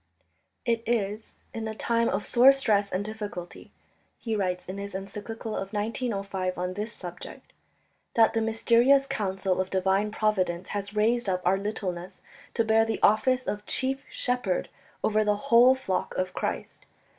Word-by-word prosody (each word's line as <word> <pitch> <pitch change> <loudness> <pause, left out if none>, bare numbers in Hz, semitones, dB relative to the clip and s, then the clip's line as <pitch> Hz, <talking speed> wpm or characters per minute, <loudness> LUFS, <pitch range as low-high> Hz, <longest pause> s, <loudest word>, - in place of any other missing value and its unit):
"It 230 -1 +1
is 215 -2 -2
in 225 -1 -4
a 220 - -5
time 230 +1 +1
of 195 - -2
sore 255 +3 +7
stress 210 -7 +1
and 190 +2 -1
difficulty," 205 -5 -7 0.5
he 225 -2 -3
writes 180 -3 -1
in 190 +2 -6
his 200 -1 -6
encyclical 210 +3 -6
of 195 +2 -5
1905 200 -4 -2
on 180 +1 -2
this 210 +3 -4
subject, 175 -4 -10 0.6
"that 225 -1 +5
the 225 - +1
mysterious 235 +5 +4
counsel 190 -5 -1
of 190 - -4
divine 190 +2 +1
Providence 190 -5 0
has 200 0 -4
raised 225 +1 +2
up 185 -1 -1
our 190 +2 +3
littleness 185 -3 -5 0.3
to 230 - +2
bear 220 0 +4
the 225 0 -2
office 255 +4 +3
of 210 0 -3
chief 265 +1 -1
shepherd 245 -7 -1 0.3
over 215 0 +3
the 210 0 +2
whole 245 +3 +5
flock 195 -8 -3
of 185 0 -2
Christ - - -4
210 Hz, 155 wpm, -27 LUFS, 190-230 Hz, 0.6 s, sore